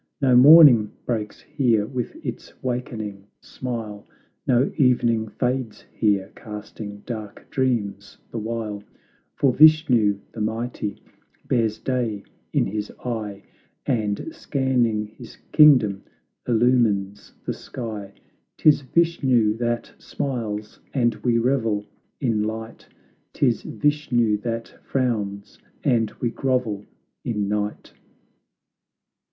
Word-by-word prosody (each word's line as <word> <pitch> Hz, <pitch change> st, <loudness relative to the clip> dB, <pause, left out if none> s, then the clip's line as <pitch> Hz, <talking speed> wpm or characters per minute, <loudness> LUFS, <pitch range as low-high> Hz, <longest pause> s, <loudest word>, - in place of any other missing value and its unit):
No 130 Hz, -3 st, +4 dB
morning 130 Hz, -5 st, +8 dB
breaks 110 Hz, -3 st, -3 dB
here 115 Hz, -7 st, +1 dB
with 125 Hz, 0 st, -4 dB
its -, -, -6 dB
wakening 110 Hz, -6 st, -4 dB
smile; 115 Hz, -5 st, -6 dB, 0.4 s
No 125 Hz, +1 st, +3 dB
evening 120 Hz, -5 st, +2 dB
fades 125 Hz, 0 st, -2 dB
here, 100 Hz, -3 st, +1 dB
casting 105 Hz, -1 st, -8 dB
dark 110 Hz, -3 st, -7 dB
dreams 105 Hz, -7 st, -1 dB
the 115 Hz, -, -3 dB
while; 110 Hz, -2 st, -4 dB, 0.5 s
For 135 Hz, -3 st, +2 dB
Vishnu, 135 Hz, -9 st, +5 dB
the 110 Hz, -, -6 dB
mighty, 110 Hz, -1 st, -3 dB, 0.4 s
bears 115 Hz, -3 st, +1 dB
day 120 Hz, -6 st, -2 dB, 0.3 s
in -, -, +2 dB
his 105 Hz, +1 st, -4 dB
eye, 105 Hz, -5 st, -4 dB, 0.4 s
And, 105 Hz, +2 st, -1 dB
scanning 125 Hz, -8 st, 0 dB
his 110 Hz, +2 st, -13 dB
kingdom, 125 Hz, -11 st, +6 dB, 0.5 s
illumines 115 Hz, -5 st, +1 dB
the -, -, -1 dB
sky; 105 Hz, -5 st, -7 dB, 0.4 s
'Tis 150 Hz, -2 st, +5 dB
Vishnu 130 Hz, -8 st, +2 dB
that 120 Hz, 0 st, -2 dB
smiles, 110 Hz, -6 st, -4 dB, 0.2 s
and 120 Hz, -3 st, +3 dB
we 120 Hz, -2 st, +1 dB
revel 115 Hz, -4 st, +1 dB, 0.3 s
in 115 Hz, -6 st, +1 dB
light; 110 Hz, +1 st, -5 dB, 0.5 s
Tis 120 Hz, -5 st, +1 dB
Vishnu 125 Hz, -7 st, +1 dB
that 115 Hz, +1 st, -5 dB
frowns, 105 Hz, -6 st, -2 dB, 0.2 s
and 115 Hz, -3 st, +2 dB
we 120 Hz, -, -1 dB
grovel 125 Hz, -7 st, -1 dB, 0.4 s
in 105 Hz, -4 st, -1 dB
night! 105 Hz, 0 st, -3 dB
115 Hz, 105 wpm, -23 LUFS, 105-125 Hz, 0.5 s, morning